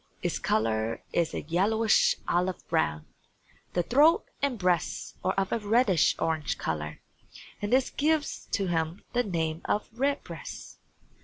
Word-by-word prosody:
Its - - -1
color 110 +1 0
is 170 -2 +1
a - - -4
yellowish 210 +7 +3
olive 180 +1 0
brown. 75 0 0 0.7
The 175 - +1
throat 305 - +4 0.2
and 275 -4 0
breast 180 -4 0
are 185 - +1
of 195 -1 0
a 230 - +1
reddish 210 -5 +3
orange 160 -2 -1
color, 75 -1 -4 0.6
and 205 - -2
this 260 +1 +3
gives 305 0 0
to 200 - +1
him 165 0 -1
the 245 - +3
name 165 -6 -2
of 210 - 0
Redbreast. 275 +4 -4
185 Hz, 140 wpm, -28 LUFS, 160-235 Hz, 0.7 s, throat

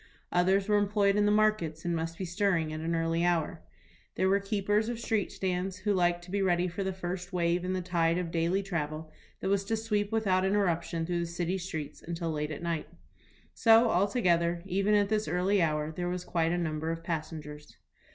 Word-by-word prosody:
Others 190 +3 +2
were 210 -1 +4
employed 200 -1 +2
in 205 0 +3
the - - +4
markets 210 -8 +1
and 170 -1 0
must 165 0 -3
be 190 - -3
stirring 175 -3 0
at 155 - -4
an 165 +1 -1
early 165 +1 0
hour. 170 -1 0 0.5
There 190 - +2
were 200 +1 +4
keepers 205 +2 0
of 240 -1 -4
street 220 -3 -1
stands, 185 0 -2
who 205 +2 0
liked 175 -2 +1
to 180 - -11
be 200 0 0
ready 180 -1 +2
for 180 +3 -4
the 190 - -1
first 180 0 -5
wave 175 -1 +1
in 185 +1 -1
the 185 -1 -2
tide 170 -1 +1
of 175 -2 -3
daily 170 +4 +1
travel 155 -4 -4 0.3
that - - -1
was 200 0 +2
to 225 +2 0
sweep 210 -2 -1
without 195 -4 +2
interruption 175 -4 0
through 175 0 -1
the 170 - -2
city 175 +2 -2
streets 160 -5 -6
until 170 -1 -3
late 150 -1 -2
at 155 +2 -6
night. 170 -2 -2 0.7
So, 225 0 +5
altogether, 175 -4 +2
even 195 +2 +1
at 205 -1 +3
this 215 0 0
early 185 +2 +2
hour 150 -1 0
there 175 +2 -3
was 180 0 -4
quite 165 -1 0
a 175 - 0
number 160 -2 -2
of 165 0 -4
passengers. 155 -2 -6
180 Hz, 210 wpm, -30 LUFS, 165-200 Hz, 0.7 s, So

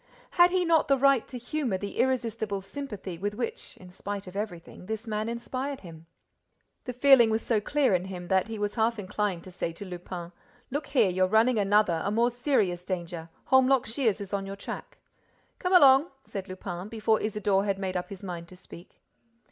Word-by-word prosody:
Had 350 0 +6
he 365 0 +1
not 330 -1 +3
the 275 - +4
right 275 -2 +3
to 255 - -7
humor 245 -4 -2
the 200 +1 -6
irresistible 230 -5 0
sympathy 200 -7 -7
with 205 +2 -2
which, 235 0 -4
in 180 -1 -13
spite 200 +2 -5
of 185 0 -11
everything, 185 -3 -6
this 220 +1 -4
man 215 0 -2
inspired 255 +4 -4
him? 165 -2 -12 0.8
The 250 - -3
feeling 250 -2 +6
was 220 +1 0
so 220 -3 +1
clear 285 0 +2
in 180 0 +1
him 180 -2 -7
that 190 +2 +2
he 225 -1 -5
was 205 0 -2
half 230 0 +1
inclined 200 -3 -2
to 185 - -11
say 170 -1 -3
to 200 - -8
Lupin: 175 -1 -7 0.4
"Look 290 +3 -3
here, 235 -9 +3
you're 185 +1 +2
running 220 +3 +3
another, 200 -4 +3
a - - 0
more 235 +4 +2
serious 225 -9 0
danger; 175 -3 -5 0.2
Holmlock 265 -1 +5
Shears 225 -2 0
is 200 -1 -7
on 195 -1 -2
your 195 - -5
track." 200 - -8 0.6
"Come 360 - -1
along!" 280 -2 +7 0.2
said 195 -1 -6
Lupin, 185 0 -6
before 220 0 +1
Isidore 205 -2 +1
had 200 -1 0
made 190 -1 -3
up 180 - -3
his 200 -1 -9
mind 175 -3 -6
to 185 - -13
speak. 180 -1 -14
210 Hz, 195 wpm, -28 LUFS, 185-245 Hz, 0.8 s, along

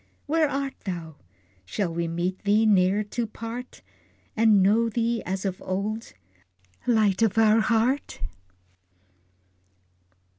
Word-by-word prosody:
Where 310 0 +2
art 275 -1 -2
thou? 170 -5 -5 0.5
Shall 170 - -3
we 170 0 -1
meet 175 +3 -2
thee 210 +2 +3
ne'er 200 0 +3
to 230 +3 -3
part, 230 +3 -8 0.5
And 215 -3 +5
know 225 +4 +3
thee 230 +1 0
as 190 +1 -3
of 185 -1 -3
old 210 +4 -3 0.7
Light 215 -5 +3
of 225 -2 +2
our 220 0 +5
heart? 235 +5 +1
215 Hz, 115 wpm, -25 LUFS, 190-230 Hz, 0.7 s, And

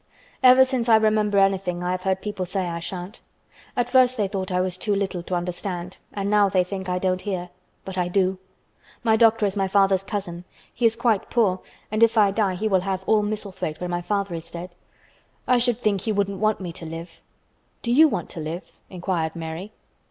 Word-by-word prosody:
"Ever 260 0 +8
since 255 -3 -1
I 225 - +8
remember 215 -2 +2
anything 190 -2 +1
I 180 - -1
have 185 0 -2
heard 190 0 -1
people 205 -3 -3
say 185 0 -2
I 170 -1 -3
shan't. 180 +4 -7 0.6
At 245 -1 +1
first 255 0 +4
they 205 -2 +1
thought 190 -1 -4
I 180 - +1
was 185 -1 0
too 205 +2 -1
little 190 -3 -2
to 180 +1 -3
understand 180 0 -4
and 200 -1 -3
now 205 -1 +4
they 185 -1 +3
think 190 0 -5
I 180 - 0
don't 185 0 0
hear. 185 -4 -4 0.4
But 190 -1 -4
I 175 - +1
do. 185 0 +1 0.6
My 225 -2 +4
doctor 225 -1 +4
is 195 0 -1
my 195 -1 +1
father's 195 -1 +3
cousin. 180 -4 -5 0.3
He 235 - +3
is 225 - 0
quite 230 -4 +1
poor 200 -6 +2 0.3
and 215 +1 -1
if 230 0 +5
I 205 -2 +5
die 195 -3 0
he 215 +4 -1
will 190 -3 +2
have 190 0 -3
all 215 +1 +3
Misselthwaite 205 -6 -3
when 180 0 -4
my 175 0 -1
father 200 0 -2
is 165 0 -6
dead. 175 +1 -8 0.7
I 250 -1 +4
should 240 -1 +1
think 205 -5 +1
he 220 - -1
wouldn't 200 -2 -1
want 215 0 +1
me 180 -3 -5
to 165 0 -7
live." 165 +2 -8 0.6
"Do 235 - -1
you 310 +6 +7
want 195 - -3
to - - -7
live?" 160 +4 -6 0.2
inquired 175 -3 -2
Mary. 165 +5 -6
195 Hz, 215 wpm, -24 LUFS, 180-215 Hz, 0.7 s, Ever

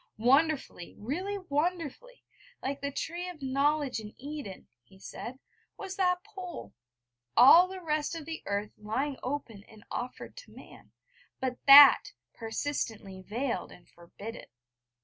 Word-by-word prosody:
Wonderfully 270 - +1
really 360 - -3
wonderfully 355 - -3 0.4
like 275 +1 -3
the 280 - -2
Tree 345 +5 -4
of 315 -6 -11
Knowledge 275 0 0
in 210 -1 -10
Eden, 280 -7 -8
he 155 +11 -21
said, 235 +6 -8 0.4
was 385 -1 -6
that 360 -2 +1
Pole: 375 -5 -9 0.6
all 305 +9 +9
the 380 0 -8
rest 305 -1 -1
of 320 -2 -8 0.2
earth 205 +1 -2
lying 260 +7 -2
open 250 -7 -5
and 215 -2 -17
offered 250 +1 -6
to - - -13
man - - -15 0.5
but 255 -1 -3
That 280 0 +9 0.2
persistently 225 -5 -4
veiled 235 +6 -3
and 175 - -16
'forbidden.' 200 +6 -10
280 Hz, 130 wpm, -29 LUFS, 225-335 Hz, 0.6 s, all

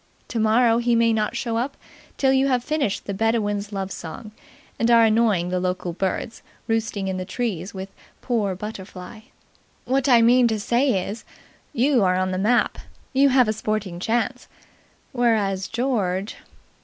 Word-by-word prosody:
Tomorrow 230 +1 +3
he 240 0 +2
may 230 0 +3
not 215 +1 -1
show 235 -1 -2
up 255 +4 -3 0.4
till 265 -1 +3
you 270 +1 +3
have 250 -3 +1
finished 285 -8 -1
the 200 - -4
Bedouin's 205 -1 -1
Love 195 -1 -4
Song 210 +7 -8 0.5
and 230 - +2
are 230 -1 +6
annoying 215 -6 +2
the 180 0 -1
local 180 -1 -2
birds, 195 +5 -3 0.3
roosting 220 -3 -1
in 190 -1 -2
the 185 - -3
trees, 195 -2 -4
with 190 +1 -6 0.3
Poor 215 -6 -1
Butterfly. 195 0 -8 0.7
What 265 +1 +1
I 235 -2 +6
mean 245 +1 +5
to 220 -2 -1
say 235 -2 +1
is, 220 +3 -6 0.5
you 260 -3 +2
are 185 -1 +2
on 185 0 0
the 185 - -2
map. 235 +5 +1 0.3
You 275 +1 +5
have 255 -2 +4
a 215 - +1
sporting 215 -4 -3
chance. 240 +5 -1 0.7
Whereas 210 -6 +1
George... 215 -6 -1
220 Hz, 160 wpm, -23 LUFS, 195-240 Hz, 0.7 s, are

